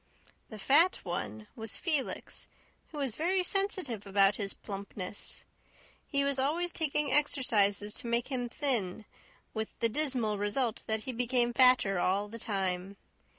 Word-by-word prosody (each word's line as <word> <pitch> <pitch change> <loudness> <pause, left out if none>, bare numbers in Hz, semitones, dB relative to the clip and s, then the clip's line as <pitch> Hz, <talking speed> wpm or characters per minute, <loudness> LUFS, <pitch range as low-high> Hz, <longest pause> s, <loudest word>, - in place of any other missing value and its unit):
"The 215 - -8
fat 305 - +4
one" 110 - -4
was 225 -1 -2
Felix, 305 -7 -3 0.4
who 310 - -10
was 275 -5 -1
very 360 - +1
sensitive 360 - -1
about 195 0 +4
his 200 -2 -2
plumpness. 200 -1 -4 0.6
He 280 -2 +1
was 280 -1 +1
always 335 +6 0
taking 300 -2 0
exercises 210 -8 +3
to - - -3
make 235 +2 0
him 245 -3 -2
thin, 230 - -1 0.5
with 220 0 -5
the 230 - +2
dismal 240 -6 +1
result 220 +3 0
that 220 0 +1
he 260 - -4
became 240 0 +1
fatter 250 -7 +4
all 195 +3 +1
the 230 +2 -8
time. 195 -2 -2
235 Hz, 145 wpm, -31 LUFS, 205-280 Hz, 0.6 s, fat